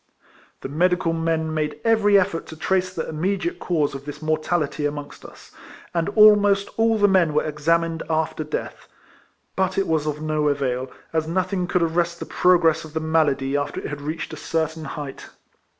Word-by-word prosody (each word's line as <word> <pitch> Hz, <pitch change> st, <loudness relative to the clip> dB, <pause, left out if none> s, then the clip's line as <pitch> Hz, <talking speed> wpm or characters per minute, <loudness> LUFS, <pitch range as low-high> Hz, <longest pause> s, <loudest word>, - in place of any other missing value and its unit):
The -, -, -5 dB
medical 175 Hz, +3 st, +1 dB
men 165 Hz, -1 st, -1 dB
made 155 Hz, -1 st, -2 dB
every 205 Hz, -3 st, +5 dB
effort 180 Hz, -3 st, -2 dB
to 160 Hz, -, -9 dB
trace 185 Hz, +3 st, 0 dB
the 170 Hz, -3 st, -4 dB
immediate 195 Hz, -, -2 dB
cause 155 Hz, -6 st, 0 dB
of 135 Hz, 0 st, -8 dB
this 145 Hz, 0 st, -7 dB
mortality 155 Hz, -1 st, -1 dB
amongst 145 Hz, 0 st, -7 dB
us; -, -, -14 dB, 0.4 s
and 170 Hz, +2 st, 0 dB
almost 205 Hz, -2 st, +6 dB
all 225 Hz, 0 st, +2 dB
the 205 Hz, -1 st, +4 dB
men 180 Hz, -6 st, +3 dB
were 150 Hz, -, +3 dB
examined 165 Hz, +2 st, 0 dB
after 160 Hz, 0 st, -1 dB
death; 150 Hz, -, -6 dB, 0.7 s
but 190 Hz, -1 st, 0 dB
it 195 Hz, -, +2 dB
was 155 Hz, -2 st, 0 dB
of 150 Hz, 0 st, -2 dB
no 155 Hz, -1 st, 0 dB
avail, 130 Hz, -3 st, -1 dB, 0.2 s
as 160 Hz, -1 st, 0 dB
nothing 185 Hz, +1 st, -1 dB
could 180 Hz, -1 st, +1 dB
arrest 170 Hz, +1 st, 0 dB
the -, -, -5 dB
progress 175 Hz, -3 st, +3 dB
of 155 Hz, 0 st, -12 dB
the -, -, +1 dB
malady 150 Hz, -4 st, +1 dB
after 145 Hz, 0 st, -2 dB
it -, -, -6 dB
had 145 Hz, -1 st, -6 dB
reached 155 Hz, +3 st, -5 dB
a -, -, -6 dB
certain 160 Hz, -1 st, -2 dB
height. 140 Hz, -1 st, -7 dB
160 Hz, 180 wpm, -23 LUFS, 150-180 Hz, 0.7 s, almost